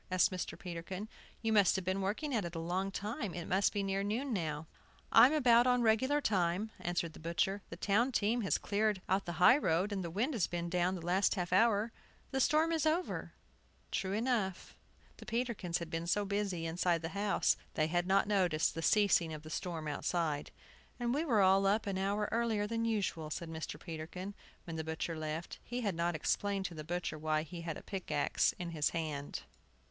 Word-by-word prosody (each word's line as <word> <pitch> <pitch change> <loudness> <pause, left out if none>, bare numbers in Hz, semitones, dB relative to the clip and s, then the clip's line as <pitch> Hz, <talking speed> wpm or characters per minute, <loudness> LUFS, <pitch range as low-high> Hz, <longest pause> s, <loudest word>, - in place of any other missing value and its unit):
asked 185 0 +3
Mr. 185 -1 -4
Peterkin. 180 +3 -6 0.4
"You 225 0 +1
must 205 -4 +5
have 190 -2 -2
been 190 +1 0
working 225 +10 -2
at 220 -4 +1
it 170 0 -6
a - - -2
long 180 +4 -1
time. 210 - -4
It 175 -2 -4
must 190 +2 +2
be 205 - -1
near 195 0 0
noon 230 +6 -1
now." 155 -5 -2 0.5
"I'm 240 +4 +8
about 245 -5 +5
on 250 -1 +3
regular 260 +6 +3
time," 195 -3 0
answered 175 -2 -2
the - - -12
butcher. 170 +5 0
"The - - -6
town 215 +8 +2
team 235 +1 +1
has 195 - +1
cleared 210 -1 0
out 190 +1 +1
the 175 - -3
high 180 - +6
road, 185 - +1
and 195 -2 -2
the 170 - -4
wind 225 - -1
has 220 -8 +1
been 170 0 -3
down 180 +1 +1
the 170 -2 -7
last 185 +5 +2
half 180 -2 -2
hour. 220 +2 +4 0.4
The 265 - 0
storm 310 +5 +3
is 320 -1 +1
over." 335 +4 -1 0.6
True 190 0 -1
enough! 215 -5 -1 0.4
The - - -11
Peterkins 230 -7 -1
had 170 -2 -7
been 165 +1 -3
so 205 +4 +1
busy 200 -4 -1
inside 170 0 0
the 165 - -2
house 200 +2 +2 0.2
they 155 - +2
had 175 +2 0
not 195 +1 +4
noticed 180 -6 +2
the 165 - -4
ceasing 195 -3 +3
of 155 -1 -7
the 155 - -9
storm 165 -3 -3
outside. 150 0 -1 0.5
"And 240 0 0
we 295 +4 +1
were 235 -10 +3
all 195 +1 +5
up 210 +3 +2
an 195 -2 -2
hour 200 +2 0
earlier 225 -3 +1
than 230 +1 -1
usual," 195 -8 -1
said 165 +2 -5
Mr. 160 -1 -5
Peterkin, 175 +4 -6 0.3
when 165 -2 -6
the 160 - -2
butcher 160 +1 -3
left. 155 +1 -5
He 245 +1 -4
had 205 -5 0
not 170 0 0
explained 195 +5 0
to 180 - -3
the 155 -2 -7
butcher 170 -1 -3
why 155 0 0
he 170 +2 -8
had 165 -2 -4
a - - -11
pickaxe 160 -7 0
in 175 -1 -5
his 155 -3 +1
hand. 150 -3 -4
190 Hz, 205 wpm, -34 LUFS, 170-215 Hz, 0.6 s, I'm